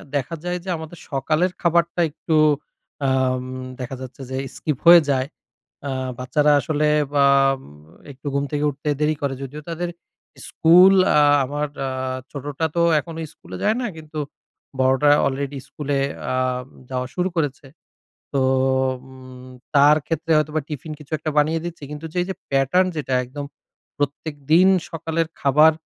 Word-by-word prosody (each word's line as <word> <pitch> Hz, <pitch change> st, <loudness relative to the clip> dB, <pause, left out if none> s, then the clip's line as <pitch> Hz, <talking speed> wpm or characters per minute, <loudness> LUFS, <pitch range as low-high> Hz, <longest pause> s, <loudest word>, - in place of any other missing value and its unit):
দেখা 140 Hz, +4 st, -1 dB
যায় 180 Hz, 0 st, -2 dB
যে, 190 Hz, -, -7 dB
আমাদের 160 Hz, +2 st, -9 dB
সকালের 155 Hz, +6 st, +1 dB
খাবারটা 170 Hz, 0 st, +2 dB
একটু 160 Hz, +1 st, -2 dB, 0.7 s
আম 130 Hz, -1 st, +1 dB, 0.4 s
দেখা 125 Hz, +1 st, -5 dB
যাচ্ছে 130 Hz, +1 st, -9 dB
যে 130 Hz, -, -3 dB, 0.2 s
skip 150 Hz, -4 st, -2 dB
হয়ে 170 Hz, 0 st, +10 dB
যায়। 130 Hz, -1 st, +1 dB, 0.6 s
আ -, -, -2 dB, 0.3 s
বাচ্চারা 150 Hz, +4 st, +2 dB
আসলে 150 Hz, +1 st, 0 dB, 0.3 s
বাম 140 Hz, -1 st, +4 dB, 0.5 s
একটু 135 Hz, +3 st, -15 dB
ঘুম 140 Hz, 0 st, +1 dB
থেকে 145 Hz, 0 st, 0 dB
উঠতে 145 Hz, +2 st, -6 dB
দেরি 155 Hz, +1 st, +2 dB
করে। 140 Hz, -1 st, -1 dB
যদিও 140 Hz, +3 st, -7 dB
তাদের 175 Hz, +1 st, -3 dB, 0.6 s
স্কুল 180 Hz, +4 st, +6 dB, 0.2 s
আ -, -, +6 dB, 0.2 s
আমার 145 Hz, +2 st, -2 dB, 0.2 s
আ -, -, -2 dB, 0.4 s
ছোটটা 145 Hz, +2 st, -3 dB
তো 170 Hz, -, +3 dB, 0.2 s
এখনো 165 Hz, +1 st, -9 dB, 0.2 s
স্কুলে -, -, -10 dB
যায় 215 Hz, +2 st, +2 dB
না, 245 Hz, -, -1 dB
কিন্তু 155 Hz, -1 st, -9 dB, 0.6 s
বড়টা 130 Hz, +3 st, +4 dB, 0.2 s
already 140 Hz, +1 st, -2 dB
স্কুলে 145 Hz, -2 st, -2 dB, 0.3 s
আ -, -, -1 dB, 0.6 s
যাওয়া 125 Hz, -1 st, -2 dB
শুরু 180 Hz, 0 st, 0 dB
করেছে। 145 Hz, -3 st, -2 dB, 0.7 s
তো 135 Hz, -, +2 dB, 0.7 s
উম 130 Hz, -1 st, -13 dB, 0.3 s
তার 145 Hz, +2 st, +7 dB
ক্ষেত্রে 165 Hz, 0 st, -2 dB
হয়তোবা 155 Hz, +1 st, 0 dB
টিফিন 155 Hz, +1 st, -6 dB
কিছু 150 Hz, 0 st, -15 dB
একটা 155 Hz, -, -3 dB
বানিয়ে 155 Hz, +2 st, +3 dB
দিচ্ছি। 170 Hz, -3 st, -7 dB
কিন্তু 150 Hz, +2 st, -7 dB
যে -, -, -5 dB
এই -, -, -1 dB
যে, -, -, -1 dB, 0.2 s
pattern 135 Hz, +7 st, +3 dB
যেটা 135 Hz, -3 st, -2 dB
একদম 140 Hz, +3 st, -7 dB, 0.5 s
প্রত্যেকদিন 145 Hz, +4 st, +1 dB, 0.2 s
সকালের 165 Hz, 0 st, -2 dB
খাবার 150 Hz, +3 st, +5 dB
150 Hz, 150 wpm, -22 LUFS, 135-160 Hz, 0.7 s, হয়ে